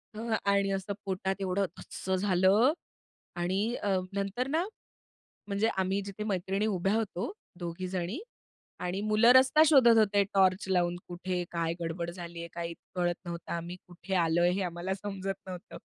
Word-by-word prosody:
अ, - - -6 0.3
आणि 200 0 +3
असं 195 +1 -2
पोटात 190 0 -1
एवढं 190 +1 +1
धस्स - - -8
झालं. 190 +7 +4 0.6
आणि 180 +2 0
अ, 205 - -2 0.2
नंतर 200 +6 -1
ना 315 +5 +1 0.8
म्हणजे 200 +2 +1
आम्ही 190 +1 +1
जिथे 200 +1 -5
मैत्रिणी 195 0 -1
उभ्या 195 -1 +1
होतो 215 - -2 0.3
दोनजणी. 180 - -3 0.6
आणि 180 +3 -2
मुलं 215 +3 +5
रस्ता 260 +4 +6
शोधत 255 -7 +7
होते 205 -2 +4
टॉर्च 190 0 +3
लावून, 175 -2 +2
कुठे 180 0 -3
काय 165 -1 -1
गडबड 170 0 -3
झाली 170 -1 -8
आहे, 170 - -5
काही 170 0 -4 0.2
कळत 175 -1 +1
नव्हतं. 170 -1 -6
आम्ही 170 +1 -4
कुठे 180 +2 -7
आलोय 175 0 +3
हे 190 +2 -1
आम्हाला 175 +1 -3
समजत 195 -1 -4
नव्हतं. 185 +3 -8
190 Hz, 150 wpm, -30 LUFS, 175-200 Hz, 0.8 s, शोधत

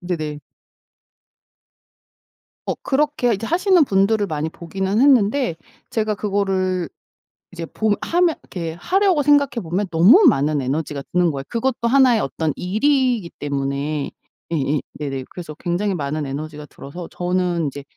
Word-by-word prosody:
네네. 155 -5 -4 2.3
어 - - -1
그렇게 280 -4 +1
이제 205 +3 -4
하시는 360 -1 +4
분들을 200 +1 +2
많이 155 0 -2
보기는 190 +6 -3
했는데 250 - +3 0.3
제가 215 -2 -1
그거를 190 -4 -1 0.6
이제 170 -1 -6
봄 215 +4 0
하면 345 -2 +2
이렇게 165 -3 -5
하려고 365 - +1
생각해 280 -5 +3
보면 185 +4 -2
너무 210 - +6
많은 145 - +1
에너지가 140 +1 -3
드는 180 -2 +3
거예요. 135 -1 -5
그것도 240 +2 -1
하나의 255 -2 +5
어떤 150 +3 -2
일이기 240 0 +1
때문에 140 +1 -2 0.4
예예 145 -2 0 0.2
네네 135 -3 -4
그래서 165 -4 -8
굉장히 185 +4 -1
많은 150 -1 -3
에너지가 150 +2 -6
들어서 165 +5 -9
저는 175 -3 -1
이제 140 +1 -6
180 Hz, 310 characters per minute, -21 LUFS, 155-235 Hz, 2.3 s, 너무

